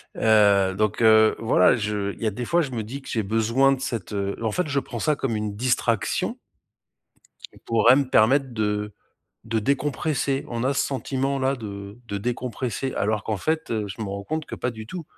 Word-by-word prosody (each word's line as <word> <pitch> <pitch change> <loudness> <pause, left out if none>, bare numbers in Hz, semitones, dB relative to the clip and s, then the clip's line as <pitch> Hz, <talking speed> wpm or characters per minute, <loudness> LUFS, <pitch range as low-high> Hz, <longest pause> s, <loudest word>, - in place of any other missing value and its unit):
Heu, 100 -3 +4
donc 105 +2 0
heu, 110 -1 +6
voilà, 110 -5 +4
je 105 -3 -2
il - - -10
y - - 0
a 110 - +1
des 120 +5 -5
fois 170 +7 +2
je 140 - -5
me 120 -3 -3
dis 135 +6 -7
que - - -10
j'ai 115 - 0
besoin 115 +6 +2
de 135 - 0
cette, 115 -6 -4
heu 100 -1 -2
en 110 - 0
fait, 180 +8 -1
je 145 -1 +1
prends 120 - -7
ça 150 +6 +1
comme 135 -5 -2
une 105 -1 -3
distraction 115 -1 0 1.3
pourrait 115 +2 +5
me 135 -2 0
permettre 130 +4 +3
de 105 -1 -2 0.5
de 115 0 0
décompresser. 140 +2 -1
On 115 -1 -3
a 135 - +2
ce - - +1
sentiment 135 0 -2
là 135 +1 +1
de 100 -2 -8
de 100 - -3
décompresser 125 +3 -3
alors 105 +1 0
qu'en 110 -2 -2
fait, 160 +9 -2
heu, 110 -2 -1
je 100 +3 -8
m'en 100 -2 -4
rends 100 - -7
compte 155 0 -3
que - - -7
pas 125 - -2
du 110 -1 -9
tout! 170 +9 -7
115 Hz, 210 wpm, -24 LUFS, 105-135 Hz, 1.3 s, heu